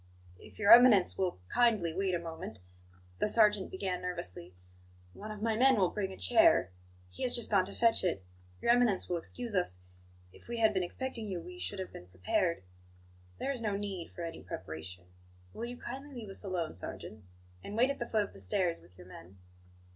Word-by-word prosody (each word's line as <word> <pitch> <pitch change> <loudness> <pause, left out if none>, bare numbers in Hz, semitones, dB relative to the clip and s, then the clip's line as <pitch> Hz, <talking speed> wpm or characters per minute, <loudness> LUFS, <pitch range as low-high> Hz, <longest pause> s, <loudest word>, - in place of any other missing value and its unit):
"If - - -15
Your 200 -1 +4
Eminence 235 -6 +7
will 185 - -1
kindly 215 - +2
wait 190 0 0
a - - -1
moment," 160 -9 -7 0.6
the - - +2
sergeant 210 -3 +4
began 185 -1 -3
nervously, 130 - -6 0.6
"one 215 - -9
of 215 0 -7
my 225 -1 +1
men 260 +3 +5
will 185 -3 +3
bring 195 -2 -2
a 190 - -9
chair. 90 0 +4 0.4
He 90 - -12
has 245 - +2
just 235 -2 0
gone 195 -3 +4
to - - -8
fetch 230 -1 +3
it. 170 - -1 0.4
Your - - +4
Eminence 240 -6 +3
will 175 - -1
excuse 235 +7 -6
us 180 - 0 0.6
if - - -18
we 235 0 -4
had 220 -2 +4
been 190 - +1
expecting 230 +4 -4
you, 185 -3 -3
we 360 - -10
should 205 - -3
have 190 -1 -6
been 90 - -10
prepared." 165 - -1 0.7
"There 275 - -2
is 255 -4 -5
no 210 -3 -1
need 195 -4 -5
for 175 - -8
any 165 -1 -6
preparation. 90 -1 -8 0.5
Will 230 - -5
you 245 +1 -7
kindly 270 +4 -8
leave 225 -4 -7
us 195 - -3
alone, 180 -5 -2
sergeant; 105 +3 -8 0.4
and 210 - -6
wait 255 +4 +4
at - - -6
the 235 - -3
foot 215 -2 +2
of 200 - -9
the - - -13
stairs 165 - 0
with 90 +2 -21
your 90 - -12
men?" 90 +1 -13
195 Hz, 205 wpm, -32 LUFS, 165-230 Hz, 0.7 s, Eminence